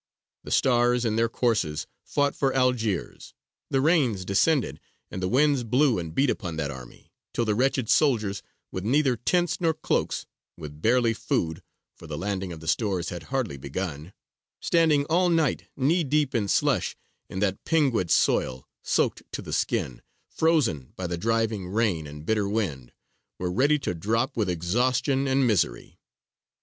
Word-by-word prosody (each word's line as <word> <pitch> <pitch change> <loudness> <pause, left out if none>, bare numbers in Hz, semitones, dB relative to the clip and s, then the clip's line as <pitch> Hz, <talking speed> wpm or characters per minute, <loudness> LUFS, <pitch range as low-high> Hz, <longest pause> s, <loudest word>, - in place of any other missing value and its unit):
The - - -9
stars 120 -1 +3
in 110 -1 0
their 115 0 +2
courses 110 -12 0 0.2
fought 145 -1 0
for 135 -1 0
Algiers: 125 -7 -1 0.3
the 135 - +1
rains 135 - +2
descended 100 - +1 0.3
and 95 - -5
the 90 - 0
winds 140 +4 +3
blew 125 0 +2
and 80 -2 -6
beat 135 -1 +3
upon 90 -6 -4
that 75 -2 -2
army, 65 -2 -12 0.2
till 120 - +1
the 110 - +1
wretched 130 +1 +1
soldiers, 110 -10 +2 0.3
with 95 - -4
neither 135 +3 +2
tents 175 +10 0
nor 165 -2 +2
cloaks, - - -1 0.3
with 75 0 -9
barely 115 +1 +3
food 80 -5 -2 0.3
for 85 - -13
the 75 -1 -5
landing 95 +1 -3
of 80 -2 -8
the 80 - -10
stores 95 -2 0
had 85 - -6
hardly 130 - -2
begun 75 +3 -5 0.5
standing 160 -4 +3
all 175 +4 +2
night 160 -5 +1
knee 160 +6 +2
deep 145 -1 +1
in 110 -4 0
slush - - +1 0.3
in - - -7
that 95 0 -1
pinguid 135 - +1
soil, 65 -5 +1
soaked - - 0
to - - -4
the - - -6
skin, - - -1 0.3
frozen 140 - +1
by 95 - -5
the 90 0 -2
driving 110 0 -1
rain 95 -7 0
and 75 +1 -10
bitter 105 -1 +1
wind, 80 - -2 0.5
were 90 -1 -2
ready 140 +10 +3
to 140 - -3
drop 115 +9 -1
with 105 -5 0
exhaustion 125 - +1
and 135 0 +2
misery. 105 -8 0
115 Hz, 160 wpm, -26 LUFS, 90-135 Hz, 0.5 s, stars